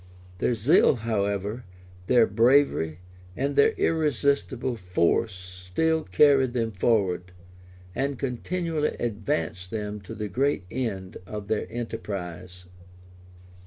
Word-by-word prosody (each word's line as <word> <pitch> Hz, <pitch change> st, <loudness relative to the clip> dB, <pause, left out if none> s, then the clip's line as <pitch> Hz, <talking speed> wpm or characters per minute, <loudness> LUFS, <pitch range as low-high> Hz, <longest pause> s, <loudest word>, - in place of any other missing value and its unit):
Their 120 Hz, -, +1 dB
zeal, 130 Hz, -, +4 dB
however, 105 Hz, 0 st, -2 dB, 0.4 s
their 120 Hz, -3 st, +5 dB
bravery, 115 Hz, -, +3 dB, 0.4 s
and 140 Hz, +1 st, -1 dB
their 140 Hz, -, +5 dB
irresistible 140 Hz, -5 st, 0 dB
force 90 Hz, +2 st, +1 dB
still 90 Hz, -, -2 dB
carried 130 Hz, +6 st, +4 dB
them 115 Hz, -2 st, -1 dB
forward, 95 Hz, -3 st, 0 dB, 0.6 s
and 135 Hz, +1 st, -1 dB
continually 150 Hz, +5 st, -2 dB
advanced 90 Hz, -6 st, -2 dB
them 105 Hz, -1 st, -4 dB
to 100 Hz, -, -9 dB
the 105 Hz, 0 st, -4 dB
great 135 Hz, +2 st, 0 dB
end 100 Hz, -8 st, -4 dB
of 105 Hz, 0 st, -7 dB
their 110 Hz, -, 0 dB
enterprise. 90 Hz, -6 st, -6 dB
110 Hz, 105 wpm, -26 LUFS, 95-135 Hz, 0.6 s, their